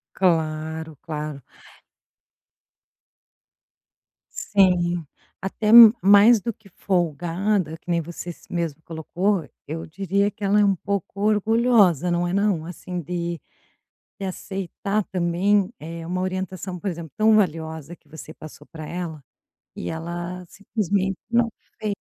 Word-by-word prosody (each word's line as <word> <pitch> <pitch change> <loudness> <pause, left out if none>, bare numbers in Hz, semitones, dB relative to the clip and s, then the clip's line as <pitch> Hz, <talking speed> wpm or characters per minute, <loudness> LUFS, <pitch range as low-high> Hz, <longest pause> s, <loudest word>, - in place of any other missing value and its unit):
Claro, 160 -2 0
claro. 150 -2 -5 3.0
Sim, 175 -4 +2 0.3
até 200 +3 -3
m 230 -1 +11
mais 205 +4 +7
do 235 +4 -3
que 205 -1 -21
folgada, 175 0 -1
que - - -29
nem 170 -1 +2
você 170 +2 -7
s - - -13
mesma 165 -3 -3
colocou, 170 +1 -1 0.2
eu 160 +2 -5
diria 195 +4 0
que 210 - -11
ela 200 +1 +3
é 210 - +5
um 195 -1 +3
pouco 200 +1 -4
orgulhosa, 210 - +3
não 175 0 +1
é 175 - -2
não? 200 -4 +1
Assim, 180 +1 -6
de 170 +1 -4 0.8
de 195 - -4
aceitar 195 +2 -3
também, 185 +3 +1
eh, 165 +1 -7
uma 185 +2 -2
orientação, 185 -1 -4
por 195 - -5
exemplo, 165 -3 -7
tão 220 0 +5
valiosa 160 -4 -1
que - - -34
você 155 0 -10
passou 150 -2 -12
pra 160 -2 -9
ela 170 -4 -5 0.5
e 85 - -5
ela, 175 +2 -5
simplesmente, 200 -1 -1
não 235 0 +3 0.3
fez. 210 -2 -1
180 Hz, 130 wpm, -23 LUFS, 165-200 Hz, 3.0 s, m